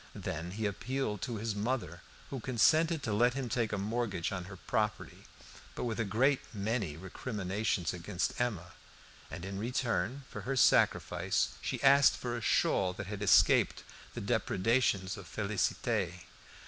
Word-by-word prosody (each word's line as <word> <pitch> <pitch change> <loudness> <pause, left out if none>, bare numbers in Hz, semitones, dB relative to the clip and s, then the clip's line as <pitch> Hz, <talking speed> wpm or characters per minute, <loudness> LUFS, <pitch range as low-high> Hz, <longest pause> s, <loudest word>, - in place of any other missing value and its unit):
Then 85 +3 -4
he 105 +4 -3
appealed 105 0 -2
to 120 +2 -3
his 110 +1 -2
mother, 105 -5 -2 0.3
who 135 - -3
consented 145 +8 +3
to 110 - -1
let 120 +4 +3
him 135 -3 -3
take 115 -1 0
a 105 - -1
mortgage 105 -3 -2
on 90 -2 -4
her 95 +1 -9
property, 105 +2 -2 0.5
but - - -4
with 115 -2 -2
a - - +2
great 130 +7 +2 0.2
many 100 -6 -2
recriminations 95 -1 -2
against 90 +5 -2
Emma; 95 -8 -2 0.6
and 85 - -7
in 95 0 -5
return 120 +1 -1
for - - -7
her 135 +1 -2
sacrifice 130 - +3
she - - -3
asked 140 -1 +6
for 120 -1 -3
a 120 - -4
shawl 95 -4 +2
that 105 +2 -6
had 100 +1 -6
escaped 100 -3 +4 0.3
the - - -4
depredations 100 -2 +1
of 100 - -10
Félicité. 100 -2 -1
105 Hz, 155 wpm, -32 LUFS, 95-120 Hz, 0.6 s, asked